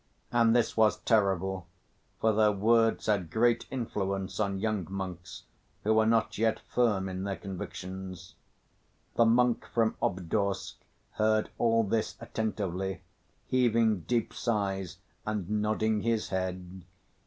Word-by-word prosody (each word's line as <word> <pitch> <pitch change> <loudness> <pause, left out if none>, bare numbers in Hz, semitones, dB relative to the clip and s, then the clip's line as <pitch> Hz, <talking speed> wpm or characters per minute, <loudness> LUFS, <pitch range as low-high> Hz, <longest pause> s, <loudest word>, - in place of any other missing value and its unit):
And 115 -1 +4
this 120 -2 +2
was 110 -1 +4
terrible, 95 -4 +1 0.5
for 110 0 +3
their 105 0 +4
words 115 +3 +2
had 100 -6 +1
great 115 +5 +2
influence 100 -7 -3
on 100 -2 0
young 105 -5 -1
monks 95 -2 -6 0.4
who 110 - +3
were 110 0 +4
not 115 -2 +1
yet 110 0 +2
firm 105 -6 +1
in 95 0 -4
their 100 -1 -2
convictions. 95 -1 -7 0.8
The 115 - +4
monk 120 +1 +3
from 115 -2 +1
Obdorsk 95 +2 -1 0.3
heard 110 0 +1
all 115 -1 +3
this 110 +1 -1
attentively, 95 -4 -3 0.4
heaving 115 -4 +2
deep 115 +7 -1
sighs 95 -5 -2 0.3
and 105 -4 -3
nodding 105 +1 0
his 115 -1 0
head. 95 -1 -4
105 Hz, 125 wpm, -29 LUFS, 95-115 Hz, 0.8 s, And